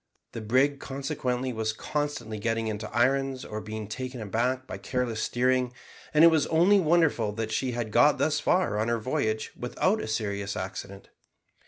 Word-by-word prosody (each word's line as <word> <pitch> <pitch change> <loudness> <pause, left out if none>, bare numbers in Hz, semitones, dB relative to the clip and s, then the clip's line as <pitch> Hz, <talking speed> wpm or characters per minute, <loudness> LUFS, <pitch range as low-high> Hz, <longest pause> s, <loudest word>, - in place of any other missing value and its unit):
The 115 - -6
brig 130 +6 +2
consequently 130 -2 -3
was 110 -1 -1
constantly 145 -5 -3
getting 115 +1 -1
into 110 0 -4
irons 135 +2 +1
or 110 0 -5
being 110 -1 -6
taken 130 +3 -5
aback 120 +5 -1
by - - -7
careless 125 -4 -2
steering, 125 0 +1 0.4
and 155 +1 +5
it 170 - +9
was 155 -3 +2
only 175 +5 +4
wonderful 155 - +2
that 110 0 -3
she 125 +3 -1
had 115 -2 -3
got - - +5
thus - - +1
far 105 - +1
on 110 - 0
her 120 0 +1
voyage 110 -2 -1
without 185 - 0
a - - -5
serious 100 -2 -2
accident. 95 +1 -7
120 Hz, 170 wpm, -27 LUFS, 110-135 Hz, 0.4 s, it